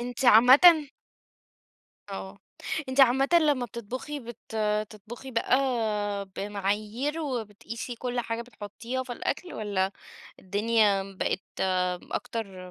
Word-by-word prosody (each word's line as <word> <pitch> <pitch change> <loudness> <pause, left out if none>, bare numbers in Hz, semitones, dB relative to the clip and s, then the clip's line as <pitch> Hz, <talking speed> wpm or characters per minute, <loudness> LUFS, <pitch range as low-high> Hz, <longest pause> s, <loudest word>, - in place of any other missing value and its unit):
أنتِ 245 +1 -4
عامةً 280 +8 +8 1.2
آه. 195 0 -7 0.5
أنتِ 260 - -2
عامةً 265 +1 +5
لمّا 285 -5 +2
بتطبُخي 245 +6 -6
بت 235 -2 -10
بتطبُخي 215 +4 -3
بقى 230 +2 +2 0.8
بمعايير 210 +8 -2
وبتقيسي 230 -3 -5
كل 245 +1 -3
حاجة 230 -1 -3
بتحُطّيها 235 +2 -6
في 250 -1 -6
الأكل 355 +8 -4
والّا 200 -3 -1 0.5
الدنيا 205 0 +2 0.2
بقت - - 0 0.7
أكتر 190 -5 -5
230 Hz, 100 wpm, -27 LUFS, 205-255 Hz, 1.2 s, عامةً